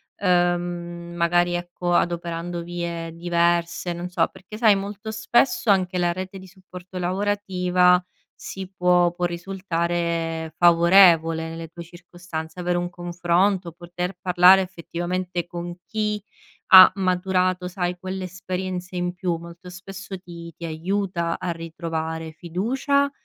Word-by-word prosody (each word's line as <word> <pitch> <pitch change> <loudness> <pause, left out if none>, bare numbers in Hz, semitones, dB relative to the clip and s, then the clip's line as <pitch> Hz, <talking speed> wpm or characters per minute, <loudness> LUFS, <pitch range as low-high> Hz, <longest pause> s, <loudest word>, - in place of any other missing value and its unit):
ehm, 175 -2 +2
mhmm, 175 0 -7
magari, 175 +1 +2
ecco, 175 0 -3
adoperando 170 0 -1
vie 170 -1 -4
diverse? 170 0 0
Non 175 +1 -5
so. 180 - +1
perché 215 +3 -11
sai, 220 -3 +5
molto 200 +2 -5
spesso, 220 +2 +1
anche 185 -2 +2
la 175 0 +2
rete 185 +1 -6
di 190 - -12
supporto 185 0 -12
lavorativa 180 -1 +2 0.4
si 190 -1 -7
può 180 -1 +3
può 175 +1 -2
risultare 170 -3 -2
favorevole, 170 -2 +5
nelle 165 0 -7
tue 170 +2 -10
circostanze. 175 -1 -8
Avere 175 0 0
un 175 0 -2
confronto, 175 +1 0
poter 175 +2 -5
parlare 180 +1 +6
effettivamente 175 0 -4
con 175 0 -6
chi 210 -1 -2 0.5
ha 190 -2 +11
maturato, 185 -1 0
sai, 180 -1 -3
quell'esperienza 185 0 -5
in 175 0 -1
più, 180 -2 -2
molto 170 +2 -11
spesso 190 +1 -8
ti 170 -2 -10
ti 170 - -12
aiuta 170 +1 -2
a 180 - -2
ritrovare 160 -1 -5
fiducia 255 - 0
175 Hz, 125 wpm, -23 LUFS, 170-185 Hz, 0.5 s, ha